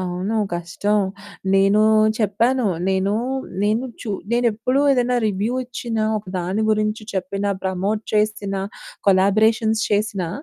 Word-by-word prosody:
అవును. 185 +4 -2 0.2
కష్టం. 175 +5 -1 0.5
నేనూ 195 +2 +4 0.4
చెప్పాను. 230 +4 +1 0.2
నేనూ 190 +2 +1 0.5
నేను 215 +5 +1 0.2
చు 220 - -5 0.2
నేనెప్పుడూ 240 +2 +1
ఏదన్నా 250 -1 +1
రివ్యూ 210 +4 -1
ఇచ్చినా, 230 -3 -3
ఒక 210 - -13
దాని 185 +5 -1
గురించి 215 0 0
చెప్పినా, 195 +2 -2
ప్రమోట్ 195 +3 -1
చేసినా, 210 -2 0 0.5
కొలాబరేషన్స్ 220 +3 +3
చేసినా, 205 -4 0
210 Hz, 110 wpm, -21 LUFS, 195-225 Hz, 0.5 s, నేనూ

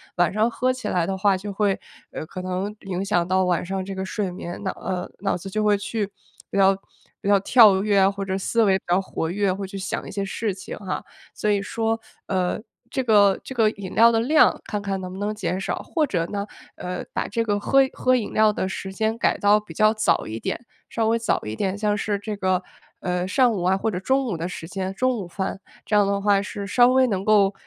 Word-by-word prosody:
晚 175 -1 +3
上 220 +2 +2
喝 255 +2 0
起 255 0 -5
来 175 -2 +1
的 190 +1 -2
话， 195 0 +3
就 200 +2 -5
会， 200 -1 +1 0.3
呃， - - -5
可 185 +3 -7
能 185 +3 -3
影 190 0 -2
响 175 -4 +1
到 185 +1 +2
晚 180 -1 0
上 190 +1 -3
这 195 +1 -6
个 190 0 -4
睡 190 -1 -2
眠， 175 0 -7
那， 190 - -1
呃， 180 -1 -4
脑 195 0 0
子 195 +2 -7
就 215 +2 -1
会 205 -1 +4
去 205 0 -3 0.4
比 - - -3
较 195 0 +6 0.5
比 - - -6
较 205 0 +6
跳 205 -4 +6
跃 200 -2 +4
或 200 0 -4
者 190 0 -2
思 230 +4 +1
维 195 -3 +4
比 - - -53
较 180 +2 +3
活 165 -3 -3
跃， 195 0 +1
会 195 0 -5
去 195 - -7
想 190 - -4
一 - - -7
些 200 0 -2
事 205 +1 -2
情 190 - -8
哈。 190 -3 -4 0.3
所 210 - -1
以 200 -1 +2
说， 225 +2 -1 0.3
呃， 185 -1 0 0.3
这 260 +1 -1
个 205 -4 +5
这 265 - -7
个 225 -3 +3
饮 200 -4 -8
料 230 +1 +6
的 225 - +2
量， 290 +7 +4
看 210 -1 -3
看 195 -1 -2
能 185 -1 -6
不 190 - -7
能 210 +1 -2
减 185 -2 -2
少。 - - -1
或 315 -4 0
者 175 -8 0
呢， 200 +1 -4 0.3
呃， 180 0 -5
把 - - -1
这 230 +2 -1
个 205 -2 0
喝 270 +6 +4
喝 255 0 +2
饮 230 -4 -2
料 215 0 +5
的 190 -2 -2
时 190 0 -5
间 220 +2 0
改 - - +1
到 205 +1 +4
比 210 - -12
较 215 0 +4
早 215 - +1
一 110 +1 -5
点， 240 - -4 0.2
稍 225 -1 0
微 230 +1 +2
早 225 - 0
一 110 +1 -4
点， 195 - -1
像 210 0 +1
是 205 0 -1
这 210 +1 -5
个， 185 -1 +1 0.4
呃， 180 0 -1
上 245 +5 +3
午 185 - -2
啊， 185 +2 +3
或 220 +3 -1
者 180 - -3
中 265 +7 +1
午 215 -8 -2
的 165 +2 -3
时 165 -2 -7
间， 190 0 -3
中 255 +3 +1
午 190 - -5
饭， 190 +2 -4 0.3
这 210 - 0
样 205 -1 +5
的 200 0 0
话 200 -1 +3
是 205 -1 -5
稍 245 +4 +5
微 260 0 +4
能 195 -4 -1
够， 205 -2 +4
200 Hz, 265 characters per minute, -23 LUFS, 190-215 Hz, 0.5 s, 较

